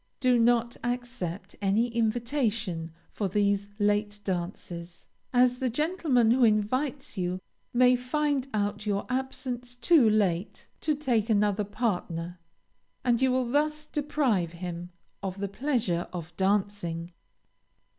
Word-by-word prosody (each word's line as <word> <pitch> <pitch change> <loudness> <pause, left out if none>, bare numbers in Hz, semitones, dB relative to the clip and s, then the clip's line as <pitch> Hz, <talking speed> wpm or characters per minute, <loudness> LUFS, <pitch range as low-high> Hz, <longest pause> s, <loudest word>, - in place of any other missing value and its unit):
Do 255 -2 +4
not 235 0 +3
accept 245 -7 -4
any 205 +5 +2
invitation 225 - -1 0.2
for 205 - -1
these 200 +1 +1
late 205 0 +1
dances, 175 -2 -5 0.3
as 250 0 +4
the 260 - +1
gentleman 290 -4 +2
who 250 +1 +4
invites 240 +4 +1
you 180 0 -1 0.3
may 250 +1 +5
find 275 +2 0
out 210 0 -1
your 200 -1 0
absence 250 -1 -3
too 250 0 +5
late 200 -3 0
to 305 -1 +1
take 245 -7 0
another 210 -1 +2
partner, 180 -6 -2 0.7
and 240 -1 +3
you 260 -1 +4
will 255 -1 +1
thus 300 +2 +1
deprive 275 - 0
him 175 0 -6 0.3
of 195 -1 -4
the 200 - -1
pleasure 210 -6 -1
of 170 -1 -7
dancing. 190 -4 0
220 Hz, 125 wpm, -28 LUFS, 195-250 Hz, 0.7 s, may